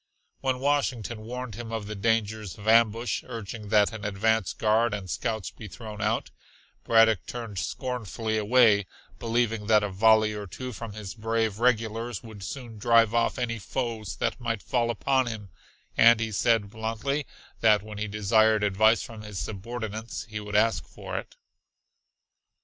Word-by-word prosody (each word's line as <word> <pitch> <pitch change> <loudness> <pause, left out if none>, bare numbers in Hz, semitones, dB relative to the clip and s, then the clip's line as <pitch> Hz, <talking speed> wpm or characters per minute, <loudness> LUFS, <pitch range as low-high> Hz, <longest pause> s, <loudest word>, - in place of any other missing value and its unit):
When 130 -1 0
Washington 130 -5 0
warned 125 +1 -6
him 115 +2 -7
of 110 -2 -3
the 105 - -5
dangers 110 -1 -1
of 105 +1 -10
ambush, 115 +1 +3
urging 110 -3 -7
that 105 +1 +4
an 110 -1 -7
advance 105 0 +1
guard 110 +1 +2
and 100 -2 -6
scouts 110 +3 -3
be 110 - -10
thrown 105 +2 -8
out, 110 +2 0 0.5
Braddock 115 -4 +4
turned 115 -6 -5
scornfully 115 -2 -3
away, 105 -2 +4 0.3
believing 115 -2 0
that 105 -1 +5
a 105 - -1
volley 110 +2 +4
or 105 -1 -6
two 125 +7 -6
from 110 +1 -7
his 105 -3 -7
brave 110 -2 -1
regulars 115 -1 0
would 110 -3 -11
soon 115 +2 -7
drive 115 0 +4
off 115 0 +1
any 115 -2 -2
foes 110 -2 -3
that - - -2
might 115 -3 -2
fall 120 -2 0
upon 130 +2 +1
him, 105 -4 -6 0.4
and 115 0 +7
he 110 -1 -2
said 110 -1 +2
bluntly 115 +6 -2 0.3
that 105 -3 +4
when 105 -1 -8
he 105 - -2
desired 105 +1 +3
advice 110 +3 +4
from 110 -2 -9
his 105 -2 -8
subordinates 110 +2 -5
he 105 -1 -5
would 105 -1 -6
ask 110 +2 +3
for - - -8
it. - - -12
110 Hz, 160 wpm, -27 LUFS, 105-115 Hz, 0.5 s, and